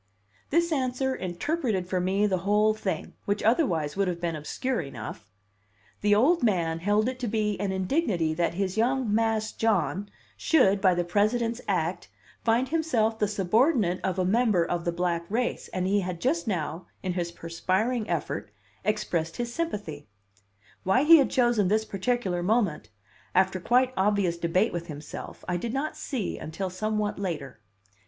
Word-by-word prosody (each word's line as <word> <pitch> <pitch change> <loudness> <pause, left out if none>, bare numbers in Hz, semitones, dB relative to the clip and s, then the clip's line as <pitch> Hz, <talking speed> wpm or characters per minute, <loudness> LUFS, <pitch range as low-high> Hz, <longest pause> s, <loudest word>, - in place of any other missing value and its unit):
This 340 +2 +2
answer 265 -2 0
interpreted 190 - -2
for 185 0 0
me 195 +3 +1
the 190 -3 +1
whole 210 +3 +3
thing, 195 -6 -4
which 205 +1 -1
otherwise 180 - +2
would 195 0 +1
have 175 -1 -2
been 170 -2 -2
obscure 240 - -2
enough: 110 -7 -8 0.7
the 205 0 +4
old 310 +11 +4
man 170 -7 +1
held 205 +5 +2
it 255 0 -3
to 245 - -2
be 210 -1 0
an 200 -1 -1
indignity 190 - 0
that 170 +1 0
his 195 +1 -2
young 245 -1 +1
"Mas' 220 0 +1
John" 205 -2 0 0.3
should, 200 -11 +3
by 185 -3 +4
the 175 - +1
President's 225 +6 +1
act, - - -1 0.4
find 235 +3 +2
himself 245 -9 +1
the 210 - +2
subordinate 205 - +2
of 190 0 -1
a 185 - +1
member 210 -3 +3
of 175 0 -2
the 170 - +1
black 170 -1 -2
race, 240 +4 -1
and 185 0 -2
he 200 +2 +2
had 180 -3 -4
just 300 - 0
now, 170 -3 -3 0.2
in 185 -2 -1
his 175 -1 -2
perspiring 190 +8 -1
effort, 160 - -2 0.3
expressed 170 -6 -1
his 235 -1 -3
sympathy! 205 - -4 0.7
Why 220 +9 +3
he 330 +2 +9
had 275 - +3
chosen 240 -6 +2
this 215 +3 +2
particular 195 -3 -1
moment 200 - 0 0.5
(after 190 0 +3
quite 250 +6 +2
obvious 195 -3 +2
debate 180 +6 +1
with 170 -1 -4
himself) 150 -2 -8
I 180 - 0
did 230 +7 -4
not 290 +3 -2
see 250 -9 -4
until 180 +4 -4
somewhat 210 +2 -2
later. 150 - -4
205 Hz, 165 wpm, -27 LUFS, 175-235 Hz, 0.7 s, he